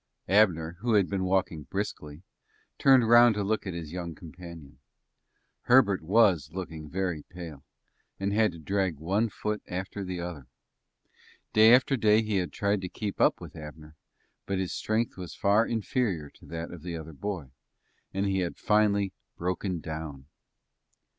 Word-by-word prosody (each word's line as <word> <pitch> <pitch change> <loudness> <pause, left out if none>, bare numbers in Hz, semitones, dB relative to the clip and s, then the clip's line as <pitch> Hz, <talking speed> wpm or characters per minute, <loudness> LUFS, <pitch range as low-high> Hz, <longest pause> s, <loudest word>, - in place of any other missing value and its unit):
Abner, 90 -4 +3
who 115 +2 0
had 100 -3 +4
been 95 -1 0
walking 90 -4 0
briskly, 75 +5 -5 0.6
turned 130 -4 +6
round 120 -1 +7
to 105 - -1
look 105 0 -1
at 90 - -4
his 80 -3 -6
young 85 -2 -5
companion. 80 -4 -11 0.9
Herbert 120 -7 +5
was 90 -5 +3
looking 80 -4 -6
very 90 -3 -2
pale, 85 -5 -10 0.6
and 100 +1 -1
had 110 -1 +3
to - - -10
drag 95 0 -1
one 100 +9 0
foot 105 +1 -3
after 95 +2 -4
the 90 -1 -4
other. 85 -7 -6 1.1
Day 110 +1 +7
after 130 +2 +2
day 110 -2 +4
he 105 -2 0
had 90 -2 -1
tried 100 -1 0
to 90 - -5
keep 105 +1 -4
up - - +4
with - - -10
Abner, 75 0 -10 0.5
but 100 - -1
his 95 -1 -2
strength 110 0 -1
was 90 -2 -7
far 105 +3 +3
inferior 105 - -1
to - - -18
that 85 0 -5
of 90 - -9
the 85 0 -5
other 80 0 -9
boy, 85 -4 -5 0.6
and 95 +1 -1
he 95 -1 +1
had 90 -2 -2
finally 100 -2 +2 0.2
broken 90 0 -2
down. 80 -4 -6
95 Hz, 160 wpm, -28 LUFS, 80-105 Hz, 1.1 s, round